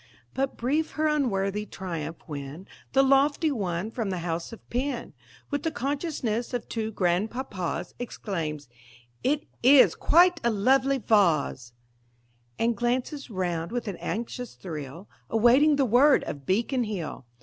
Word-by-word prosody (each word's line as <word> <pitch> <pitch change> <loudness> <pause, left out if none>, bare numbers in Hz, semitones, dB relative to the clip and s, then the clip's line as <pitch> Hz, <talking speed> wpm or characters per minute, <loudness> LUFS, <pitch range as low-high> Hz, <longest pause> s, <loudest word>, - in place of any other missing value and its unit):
But 270 0 -2
brief 300 +6 0
her 310 - 0
unworthy 210 -9 0
triumph 165 -5 -5
when 145 +3 -7 0.3
The 270 +1 +5
lofty 280 +3 +3
one 195 -4 -2
from 225 -4 -3
the 185 - -2
house 165 0 -3
of 230 - -12
Penn, 255 - -2 0.4
With 285 -1 -1
the 325 - 0
consciousness 265 -5 -2
of 240 - -4
two 220 -1 -3
grandpapas, 195 +1 -2
Exclaims: 165 - -4 0.6
"It 290 +3 +1 0.2
is 265 +2 +7
quite 350 +1 +4
a 235 - +3
lovely 265 +6 +3
vahs!" 165 - +2 0.8
And 230 0 +1
glances 250 +6 -2
round 175 -4 -2
with 240 -1 -3
an 195 -4 -4
anxious 240 +2 -5
thrill, 160 +1 -7 0.2
Awaiting 250 +7 +5
the 280 -1 +2
word 255 +5 +5
of 140 -2 -7
Beacon 235 +5 +1
Hill. 175 - -5
230 Hz, 140 wpm, -27 LUFS, 185-270 Hz, 0.8 s, is